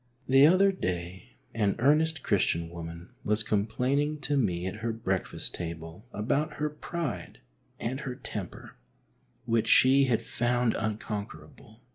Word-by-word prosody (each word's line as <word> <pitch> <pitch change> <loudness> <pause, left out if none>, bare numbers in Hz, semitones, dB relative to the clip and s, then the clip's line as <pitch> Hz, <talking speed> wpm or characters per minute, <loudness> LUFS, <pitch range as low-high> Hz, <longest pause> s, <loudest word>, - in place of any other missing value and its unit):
The 135 +3 +7
other 190 +4 +5
day 90 - -4 0.2
an 105 -3 +1
earnest 155 +5 +2
Christian 85 -5 +1
woman 85 0 -8
was 105 +1 +2
complain 110 +6 0
ing 150 +1 -1
to 145 0 0
me 90 -9 0
at 95 +3 -4
her 115 +2 -2
breakfast 95 -4 -2
table 85 +5 -6
about 145 +9 -1
her 150 0 -2
pride 160 -1 -5 0.4
and 130 +3 -3
her 135 -4 -5
temper, 110 -7 -7 0.7
which 115 -1 +1
she 135 +2 +6
had 120 -4 +1
found 120 -1 +1
unconquerable. 105 - -5
115 Hz, 135 wpm, -29 LUFS, 95-140 Hz, 0.7 s, The